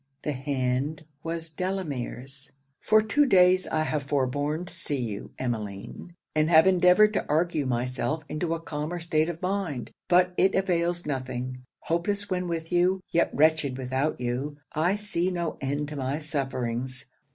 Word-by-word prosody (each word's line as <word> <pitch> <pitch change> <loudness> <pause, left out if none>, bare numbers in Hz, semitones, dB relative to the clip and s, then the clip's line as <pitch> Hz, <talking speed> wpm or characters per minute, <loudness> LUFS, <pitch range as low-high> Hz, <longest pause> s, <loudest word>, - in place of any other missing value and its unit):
The 150 - -1
hand 135 +2 -1 0.2
was 165 0 -3
Delamere's. 145 -6 -4 0.3
'For 215 0 +4
two 280 +7 +3
days 185 -3 +5
I 155 0 +1
have 155 -1 -1
forborne 145 +4 -1
to - - -6
see 145 - -1
you, 110 -5 -4
Emmeline, 110 - -5 0.2
and 155 +1 +2
have 160 0 +7
endeavoured 185 +3 +5
to - - 0
argue 155 -2 +1
myself 125 +5 -1
into 165 +2 -1
a - - -5
calmer 160 +2 -4
state 160 -1 +1
of 170 +1 -6
mind; 180 - -2 0.2
but 180 0 +4
it 190 - +4
avails 175 -2 +1
nothing; 130 -2 -3 0.2
hopeless 200 +4 -1
when 180 -1 0
with 165 -1 -3
you, 180 +2 +3
yet 170 - +3
wretched 155 -3 +3
without 130 +3 -1
you, 125 +4 -2 0.2
I 170 +6 +2
see 205 -4 -1
no 175 -3 -3
end 145 +2 -1
to 150 - -6
my 135 +1 -1
sufferings. 130 -4 -3
155 Hz, 155 wpm, -27 LUFS, 135-175 Hz, 0.3 s, have